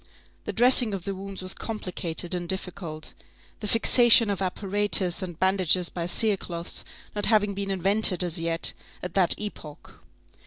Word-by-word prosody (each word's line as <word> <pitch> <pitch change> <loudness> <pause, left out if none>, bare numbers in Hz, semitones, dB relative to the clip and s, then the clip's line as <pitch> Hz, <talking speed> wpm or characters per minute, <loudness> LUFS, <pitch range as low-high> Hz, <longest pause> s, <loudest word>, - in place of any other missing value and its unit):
The - - -4
dressing 240 -2 +5
of 185 - -8
the 200 - -4
wounds 195 0 -8
was 185 - -1
complicated 180 -5 -4
and 175 -1 -5
difficult, 175 -4 -5 0.5
the 210 - -6
fixation 230 0 +4
of 195 - -5
apparatus 195 -1 +1
and 175 -4 -8
bandages 185 -2 +1
by 170 -1 -6
cerecloths 180 -4 -1 0.3
not 205 - -3
having 210 -2 +1
been 195 0 -5
invented 195 0 +3
as 175 -1 0
yet, 165 0 -1 0.3
at 180 - -7
that 185 -3 +4
epoch. 165 -8 -10
190 Hz, 150 wpm, -24 LUFS, 175-205 Hz, 0.5 s, dressing